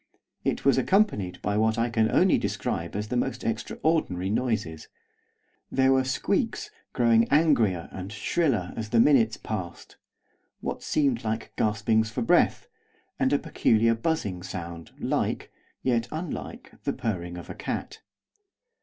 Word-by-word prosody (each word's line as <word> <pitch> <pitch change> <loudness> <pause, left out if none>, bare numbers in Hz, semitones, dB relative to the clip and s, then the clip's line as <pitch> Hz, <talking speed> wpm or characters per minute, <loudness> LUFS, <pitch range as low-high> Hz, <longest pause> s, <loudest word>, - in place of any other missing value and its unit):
It - - -1
was 135 -2 +5
accompanied 130 - +1
by 105 +1 0
what 110 +1 +2
I 115 +1 0
can 110 -1 +2
only - - +4
describe 85 +2 -3
as 105 +1 -3
the 125 - -2
most 125 0 -1
extraordinary 110 - -1
noises. 110 -9 -2 0.8
There 130 0 +4
were 130 0 +3
squeaks, 130 - -1 0.2
growing 115 -1 +4
angrier 120 - +3
and 95 +1 -7
shriller 105 - 0
as 110 -1 -5
the 115 - +3
minutes 115 -4 +4
passed; 90 -6 -6 0.6
what - - -4
seemed 135 -6 +1
like 110 0 -3
gaspings 110 +1 +1
for 115 - -2
breath; - - +3 0.5
and 130 0 +2
a 145 - +4
peculiar 115 -3 +2
buzzing 115 - -2
sound 85 -2 -7
like, - - -1 0.3
yet 120 -2 +1
unlike, 160 +1 -6
the - - -1
purring 90 -8 -3
of 85 - -9
a - - -6
cat. - - -5
115 Hz, 140 wpm, -27 LUFS, 100-130 Hz, 0.8 s, was